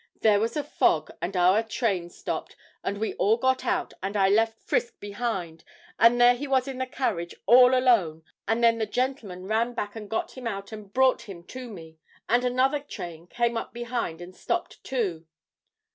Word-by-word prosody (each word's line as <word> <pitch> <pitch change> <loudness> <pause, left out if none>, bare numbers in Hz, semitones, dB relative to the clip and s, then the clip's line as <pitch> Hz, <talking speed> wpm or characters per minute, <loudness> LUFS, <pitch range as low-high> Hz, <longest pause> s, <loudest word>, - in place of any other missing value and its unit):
There 210 -2 +5
was 230 +5 -1
a 295 - 0
fog 160 - +1
and 180 +3 -3
our 185 +4 +5
train 215 -6 -1
stopped, - - -5 0.3
and 200 - -2
we 220 +2 -2
all 220 +3 +3
got 260 +1 +1
out, - - 0
and 195 +2 -2
I 195 -1 +4
left 225 +2 +2
Frisk 235 - -1
behind, 200 -6 -4 0.4
and 235 +1 +6
there 245 0 +7
he 270 +4 -5
was 265 -1 +2
in 265 -1 -5
the 260 - -1
carriage 185 -10 -2
all 250 +1 +7
alone, 195 -12 +2 0.2
and 225 +3 +1
then 230 -1 +4
the 220 - -1
gentleman 230 -7 -3
ran 225 +4 0
back 205 0 -4
and 210 -2 -8
got 225 - -2
him 255 -2 -5
out 200 -2 -5
and 210 -2 -9
brought 255 -2 +2
him 170 -3 -9
to 255 -1 -7
me. 160 -6 -11 0.3
And 240 +2 +3
another 255 +3 +2
train 175 - -8
came 235 +3 0
up - - -5
behind 235 -8 -3
and 180 +1 -10
stopped 350 - -3
too.' 185 -11 -2
225 Hz, 190 wpm, -26 LUFS, 195-250 Hz, 0.4 s, there